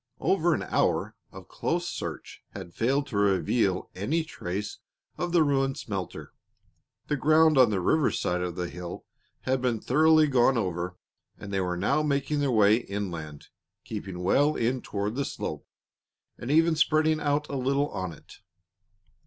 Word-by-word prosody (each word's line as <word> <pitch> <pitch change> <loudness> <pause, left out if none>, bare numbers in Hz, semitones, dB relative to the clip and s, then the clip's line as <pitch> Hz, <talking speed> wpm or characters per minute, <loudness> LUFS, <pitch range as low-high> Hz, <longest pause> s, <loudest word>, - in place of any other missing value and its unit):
Over - - +2
an - - -3
hour - - 0 0.2
of - - -12
close - - -2
search - - -6
had 90 -3 -8
failed 135 +5 +1
to 110 - -3
reveal 95 0 +1
any 145 - -1
trace 105 - -5 0.4
of 175 -1 -3
the 170 -2 +4
ruined 135 -2 +1
smelter. 95 -4 -6 0.7
The 150 - -1
ground 155 +3 +4
on 130 -4 +6
the 100 -3 0
river 150 - +2
side 90 0 -1
of 90 -1 -3
the 90 -1 -3
hill 90 0 -8 0.4
had 130 0 0
been 120 -3 0
thoroughly 155 +5 +4
gone 130 -2 +3
over, 90 -3 -3 0.4
and 100 - -8
they 95 - +1
were 90 -1 -2
now 100 +11 +1
making 145 0 0
their 140 -1 +1
way 110 -2 +5
inland, 90 -10 -6 0.3
keeping 95 -4 -6
well 145 +11 +3
in 125 +2 0
toward 100 +1 -3
the 140 +3 -1
slope, - - -5 0.7
and 120 - -8
even 165 +2 +4
spreading 155 0 +2
out 145 0 0
a 140 - -5
little 140 +2 0
on 95 -2 -4
it. 80 - -15
120 Hz, 160 wpm, -27 LUFS, 95-145 Hz, 0.7 s, on